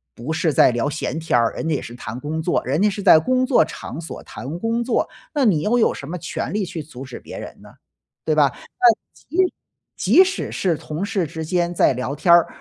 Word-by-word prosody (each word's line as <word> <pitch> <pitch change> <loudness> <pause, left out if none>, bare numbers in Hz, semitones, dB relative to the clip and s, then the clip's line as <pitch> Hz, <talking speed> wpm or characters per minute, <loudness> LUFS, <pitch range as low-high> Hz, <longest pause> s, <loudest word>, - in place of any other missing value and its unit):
不 125 +7 -5
是 160 0 +1
在 130 - +5
聊 120 +4 -1
闲 155 +1 -3
天 160 -6 +1
儿， 115 - +2
人 - - -4
家 155 - +1
也 - - -2
是 120 - -9
谈 115 -1 -7
工 155 +4 -3
作， 175 - 0
人 140 +7 0
家 210 - +4
是 205 0 -5
在 180 -5 +8
工 255 +8 +1
作 255 - +4
场 155 -1 -8
所 165 - -8
谈 150 +6 -7
工 230 +3 0
作， 240 - 0 0.2
那 290 -3 +1
你 175 -9 +3
又 220 +8 +2
有 220 - +3
什 140 - -8
么 180 - -4
权 170 - -4
利 210 0 0
去 170 -2 -6
阻 135 -3 -10
止 130 - -9
别 - - -10
人 - - -10
呢？ - - -15 0.5
对 155 - +1
吧。 145 -2 +5 0.3
那 360 -2 +7 0.2
即 365 +3 -1 0.4
即 375 - +6
使 375 0 -3
是 175 -5 0
同 155 +5 -5
事 200 -5 -1
之 160 +2 -6
间 175 +1 0
在 - - +4
聊 130 +3 -3
天 170 +4 +4
儿， 170 -1 +6
165 Hz, 255 characters per minute, -21 LUFS, 150-210 Hz, 0.5 s, 在